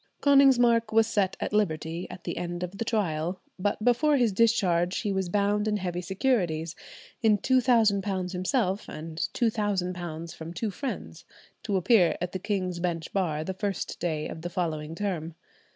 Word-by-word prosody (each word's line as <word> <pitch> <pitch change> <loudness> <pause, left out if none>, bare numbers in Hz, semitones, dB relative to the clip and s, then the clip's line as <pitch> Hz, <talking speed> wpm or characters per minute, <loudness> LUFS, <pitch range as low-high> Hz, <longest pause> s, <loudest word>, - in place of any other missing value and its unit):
Konigsmark 245 -5 +5
was 225 0 +5
set 205 -4 0
at - - -3
liberty 165 -4 -1
at 180 - -10
the - - -4
end 175 0 -3
of 180 +2 -6
the - - +1
trial, 180 -6 -1 0.2
but 205 +2 -1
before 285 +5 +4
his 240 -4 +3
discharge 190 -5 +2
he 210 - -1
was 190 -2 -1
bound 205 +2 +1
in 210 -1 +1
heavy 180 -2 -3
securities, 175 -5 0 0.5
in 215 -2 +4
£2,000 205 -7 +2
himself, 190 +2 -1
and 160 +1 -7 0.2
£2,000 180 -7 -1
from 165 0 -8
two 215 +4 -2
friends, 265 +7 -6 0.4
to 200 -3 0
appear 185 -2 +4
at 180 0 -3
the 185 - -4
King's 185 -3 -2
Bench 170 -2 -3
Bar 160 -6 0
the 190 - -3
first 195 0 -3
day 155 -3 -2
of 160 - -7
the 175 - -4
following 160 -3 -3
term. 170 -4 -3
190 Hz, 165 wpm, -27 LUFS, 175-215 Hz, 0.5 s, Konigsmark